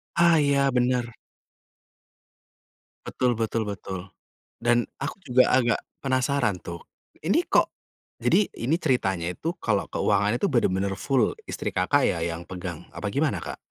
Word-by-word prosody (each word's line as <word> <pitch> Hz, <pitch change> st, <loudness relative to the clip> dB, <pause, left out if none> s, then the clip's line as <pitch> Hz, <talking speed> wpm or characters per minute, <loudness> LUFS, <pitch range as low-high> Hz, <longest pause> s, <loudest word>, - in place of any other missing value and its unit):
Ah 170 Hz, -1 st, +5 dB
iya, 140 Hz, -1 st, +3 dB
bener. 125 Hz, -1 st, +1 dB, 1.9 s
Betul 125 Hz, -2 st, 0 dB
betul 115 Hz, 0 st, 0 dB
betul. 95 Hz, -2 st, -6 dB, 0.5 s
Dan 120 Hz, 0 st, +2 dB
aku 140 Hz, +6 st, -4 dB
juga 125 Hz, -5 st, +3 dB
agak 120 Hz, -3 st, +3 dB, 0.2 s
penasaran 130 Hz, -5 st, +1 dB
tuh, 85 Hz, -1 st, -7 dB, 0.4 s
ini 305 Hz, -, +2 dB
kok -, -, +3 dB, 0.5 s
jadi, 205 Hz, -, +3 dB
ini 155 Hz, +9 st, 0 dB
ceritanya 95 Hz, -, +1 dB
itu 160 Hz, -, -3 dB
kalau 105 Hz, -3 st, +1 dB
keuangan 100 Hz, +1 st, +1 dB
itu 200 Hz, -, +2 dB
benar-benar 95 Hz, -, +1 dB
full 130 Hz, +2 st, +1 dB
istri -, -, -3 dB
Kakak -, -, +2 dB
ya -, -, +2 dB
yang 85 Hz, 0 st, -5 dB
pegang? 90 Hz, -3 st, -7 dB
Apa -, -, -5 dB
gimana, -, -, +1 dB
Kak? -, -, -6 dB
120 Hz, 135 wpm, -26 LUFS, 95-140 Hz, 1.9 s, Ah